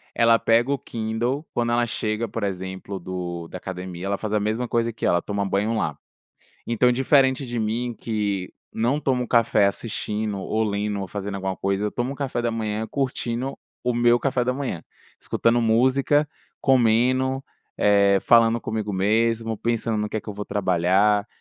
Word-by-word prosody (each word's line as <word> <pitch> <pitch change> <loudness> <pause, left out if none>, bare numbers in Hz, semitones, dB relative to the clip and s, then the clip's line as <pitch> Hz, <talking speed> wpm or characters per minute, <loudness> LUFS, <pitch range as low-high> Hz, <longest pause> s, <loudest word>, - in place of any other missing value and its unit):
Ela 115 0 +5
pega 115 +4 +3
o 140 - +1
Kindle 120 +6 -2
quando 120 -1 0
ela 120 0 +2
chega, 115 -1 -2
por 115 +1 -5
exemplo, 95 0 -4
do 85 -2 -5
da 90 - -7
academia, 90 -1 -6
ela 100 0 0
faz 110 0 -4
a 105 - +3
mesma 110 +4 -1
coisa 115 0 0
que 110 - -5
eu, - - +4
ela 85 - +2
toma 100 +1 -2
banho 105 +4 0
lá. 75 -8 -1 0.7
Então, 120 +2 +3
diferente 130 +1 +3
de 120 -1 -4
mim, 115 +3 -1
que 105 -4 -2 0.2
não 120 +6 0
tomo 125 -4 0
café 115 -4 +4
assistindo 105 0 -3
ou 110 +3 -1
lendo 105 -1 -1
ou 95 - -4
fazendo 100 +2 -5
alguma 95 -1 -3
coisa, 100 +1 -1
eu 105 - -2
tomo 125 +3 -2
o - - -10
café 135 -4 -2
da 120 -1 0
manhã 110 -1 -2
curtindo 130 -1 -2 0.3
o 125 0 +1
meu 120 0 +4
café 130 -2 0
da 125 - +1
manhã, 130 - -4 0.4
escutando 115 +1 +1
música, 130 +6 +3 0.3
comendo, 130 +2 +3 0.3
eh, 100 -1 +4
falando 115 -1 +4
comigo 110 -2 -3
mesmo, 115 +3 +1
pensando 115 -1 -1
no 105 0 -1
que - - -2
é - - -4
que - - -9
eu - - -5
vou 105 +1 -6
trabalhar, 100 +2 +2
110 Hz, 180 wpm, -24 LUFS, 100-120 Hz, 0.7 s, Ela